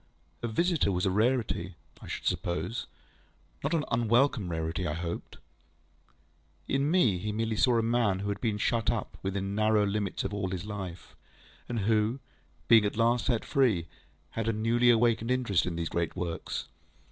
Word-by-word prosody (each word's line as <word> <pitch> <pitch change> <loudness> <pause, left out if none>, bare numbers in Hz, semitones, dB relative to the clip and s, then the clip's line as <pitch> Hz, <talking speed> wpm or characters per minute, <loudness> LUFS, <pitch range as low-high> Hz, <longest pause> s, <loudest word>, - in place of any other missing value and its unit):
A 120 - -1
visitor 165 - +1
was 90 0 0
a 95 - +2
rarity, 105 -5 0 0.3
I - - -10
should - - -5
suppose; 90 +7 -2 0.8
not 170 - +1
an 155 - 0
unwelcome 115 -2 +2
rarity, 80 +2 -2
I 75 - -1
hoped? 85 0 -5 1.3
In 140 +2 +1
me, 125 - +3
he 105 +3 -3
merely 110 +1 -1
saw 120 +2 +3
a 115 - +2
man 115 -4 +2
who 100 +2 -3
had 100 -1 -3
been 110 -4 0
shut 115 +1 +1
up - - -2
within 95 0 -2
narrow 110 0 +3
limits 100 -1 -2
all 100 -1 -2
his 90 0 -4
life, 95 -5 -7 0.5
and 120 -3 -1
who, 110 +4 +1 0.5
being 110 -2 +7
at 105 +1 -2
last 115 +1 +2
set 120 -4 +1
free, 115 -12 +2 0.5
had 115 -1 -3
a 115 - +2
newly 115 +3 +3
awakened 115 0 +3
interest 120 -9 +1
in 85 - -2
these 85 -1 -2
great 85 -1 -2
works. 85 -2 -4
110 Hz, 170 wpm, -29 LUFS, 95-120 Hz, 1.3 s, being